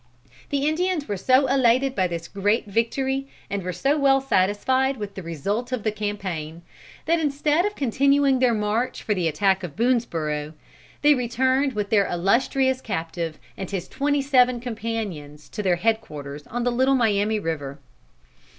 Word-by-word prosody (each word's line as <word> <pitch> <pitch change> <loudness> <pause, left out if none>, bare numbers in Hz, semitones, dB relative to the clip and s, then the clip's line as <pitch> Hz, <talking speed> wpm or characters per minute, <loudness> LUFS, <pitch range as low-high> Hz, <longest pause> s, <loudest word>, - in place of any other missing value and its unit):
The 285 0 0
Indians 335 -1 0
were 205 - -2
so 255 +8 +3
elated 260 0 +3
by 185 -7 +1
this 170 -1 -5
great 205 +3 0
victory, 265 +6 -1 0.2
and 200 0 -1
were 180 0 -3
so 275 - 0
well 270 -1 +4
satisfied 260 +4 +1
with 205 -2 -6
the 195 - -7
result 200 - -3
of 250 -5 -2
the 215 - +1
campaign, 190 -6 -4 0.4
that 335 +1 +2
instead 300 +4 +1
of 415 - -6
continuing 275 +1 +2
their 250 -2 +3
march 215 +4 -1
for 215 - 0
the 180 -4 0
attack 190 +4 +2
of 170 -5 -6
Boonesborough, 165 -11 -1 0.5
they 295 0 +7
returned 260 +2 +1
with 210 -2 -3
their 200 -3 +4
illustrious 255 +8 +1
captive 165 -5 -4 0.2
and 190 - -6
his 190 -3 -4
twenty 285 0 0
seven 255 -3 +3
companions 215 - -5
to - - -5
their 185 -3 +2
head 220 +5 +1
quarters 145 -6 -9
on 240 +1 -3
the 245 - +1
Little 260 +3 +3
Miami 215 -3 +2
River. 145 -6 -4
225 Hz, 165 wpm, -24 LUFS, 185-265 Hz, 0.5 s, they